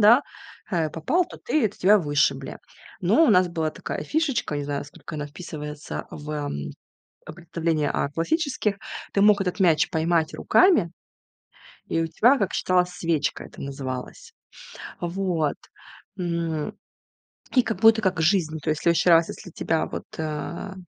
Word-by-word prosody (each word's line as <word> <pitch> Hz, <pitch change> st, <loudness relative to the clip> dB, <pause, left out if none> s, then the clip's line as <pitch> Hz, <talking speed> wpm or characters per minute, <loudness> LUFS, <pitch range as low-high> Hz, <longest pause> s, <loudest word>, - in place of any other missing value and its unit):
да, 230 Hz, +7 st, +7 dB, 0.5 s
э, 165 Hz, -4 st, +1 dB
попал, 300 Hz, -, +1 dB
то -, -, -12 dB
ты 310 Hz, -, +1 dB
то -, -, -17 dB
тебя 205 Hz, +3 st, +5 dB
вышибли, 145 Hz, -3 st, 0 dB, 0.4 s
но 220 Hz, -, +4 dB
у -, -, +4 dB
нас 180 Hz, -3 st, +5 dB
была 160 Hz, -2 st, -1 dB
такая -, -, -5 dB
фишечка, 295 Hz, -, 0 dB
не 145 Hz, -, -3 dB
знаю, 145 Hz, 0 st, -2 dB
насколько 145 Hz, +2 st, -10 dB
она 150 Hz, -1 st, -4 dB
вписывается 150 Hz, -1 st, -7 dB
в, 150 Hz, 0 st, -8 dB
эм, 145 Hz, -, -4 dB, 0.6 s
представление 165 Hz, -1 st, -2 dB
о -, -, 0 dB
классических: 215 Hz, -, -1 dB, 0.4 s
ты 200 Hz, -, +1 dB
мог 205 Hz, 0 st, +5 dB
этот 195 Hz, +1 st, -2 dB
мяч 165 Hz, -4 st, +4 dB
поймать 160 Hz, 0 st, +1 dB
руками, 345 Hz, -, +4 dB, 1.0 s
и 165 Hz, -, 0 dB
у 165 Hz, -, -1 dB
тебя, 245 Hz, -, +4 dB
как 195 Hz, -, -1 dB
считалось, 180 Hz, -1 st, +2 dB
"свечка" 165 Hz, -4 st, -1 dB
это -, -, -13 dB
называлось. 135 Hz, -, -6 dB, 0.7 s
А 175 Hz, -, -2 dB
вот, 170 Hz, -4 st, -1 dB, 0.6 s
м, 170 Hz, -4 st, -2 dB, 0.8 s
и 255 Hz, -, +7 dB
как 220 Hz, -, -3 dB
будто 225 Hz, 0 st, +6 dB
как 185 Hz, -4 st, 0 dB
жизнь, 160 Hz, -3 st, +2 dB
то -, -, -4 dB
есть 155 Hz, 0 st, 0 dB
в -, -, -12 dB
следующий 170 Hz, +1 st, +3 dB
раз 165 Hz, -1 st, +6 dB
если -, -, -8 dB
тебя 160 Hz, 0 st, 0 dB
вот, -, -, -6 dB
э, 160 Hz, +5 st, -4 dB
170 Hz, 160 wpm, -24 LUFS, 155-200 Hz, 1.0 s, да